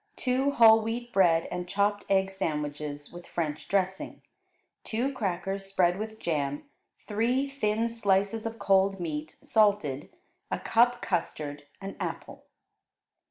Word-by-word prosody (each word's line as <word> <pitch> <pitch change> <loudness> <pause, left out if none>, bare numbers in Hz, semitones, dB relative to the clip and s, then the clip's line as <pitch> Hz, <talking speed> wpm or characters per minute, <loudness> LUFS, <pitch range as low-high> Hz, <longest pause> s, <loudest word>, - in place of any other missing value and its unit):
Two 260 +2 +1
whole 225 -4 +7
wheat 240 +2 -4
bread 170 -4 +4
and 180 0 -4
chopped 205 +1 +1
egg 195 0 +2
sandwiches 150 -5 -4
with 175 0 -10
French 155 -3 -3
dressing; 190 -1 -1 0.6
two 245 +5 -1
crackers 195 -3 -3
spread 185 -1 +2
with 220 0 -5
jam; 145 -3 -2 0.4
three 240 +6 +1
thin 230 -5 0
slices 215 -1 0
of 225 0 -6
cold 195 -1 +2
meat, 155 -2 -4
salted; 200 -11 +2 0.4
a - - -1
cup 240 +1 +2
custard; 145 -5 -3
an 195 0 -6
apple. - - -6
195 Hz, 125 wpm, -28 LUFS, 170-225 Hz, 0.6 s, whole